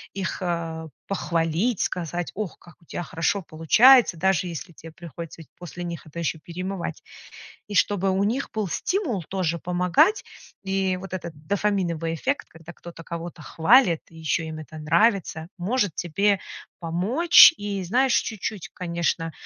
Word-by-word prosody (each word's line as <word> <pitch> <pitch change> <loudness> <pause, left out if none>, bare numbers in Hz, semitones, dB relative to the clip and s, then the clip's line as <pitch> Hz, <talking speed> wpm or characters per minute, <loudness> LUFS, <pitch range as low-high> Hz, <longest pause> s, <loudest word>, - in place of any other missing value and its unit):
их, 190 -3 -3
э, 165 -2 -3 0.2
похвалить, 175 +3 0
сказать: 175 0 -3
"Ох, 210 -5 -4
как 175 - -18
у - - -23
тебя 175 - -5
хорошо 165 +4 -1
получается". 215 - +5
Даже 190 +1 +1
если 170 +1 -7
тебе 165 +1 -12
приходится 170 -1 -9
ведь 160 - -15
после 175 0 -8
них 170 -2 -6
это 155 - -12
ещё 165 -1 -2
перемывать. 180 -1 -5 0.6
И 205 - -7
чтобы 195 0 +2
у 190 +1 +1
них 250 +6 -1
был 215 -4 -2
стимул 335 - -1
тоже 175 -3 -1
помогать, 180 - +2 0.4
и 190 -1 0
вот 190 0 -9
этот 175 -2 -5
дофаминовый 180 -5 0
эффект, 270 - -2
когда 165 +1 -13
кто-то 170 -1 -11
кого-то 170 -1 -7
хвалит 175 - +4
и 165 - -16
ещё 160 +1 -1
им 160 0 -6
это 155 0 -10
нравится, 165 0 +1
может 205 -1 0
тебе 195 +4 +1 0.4
помочь 210 - +6
и, 200 -1 -3
знаешь, 250 +7 +2
чуть-чуть, 210 -2 -5
конечно, 170 -2 -2
175 Hz, 150 wpm, -24 LUFS, 165-200 Hz, 0.6 s, помочь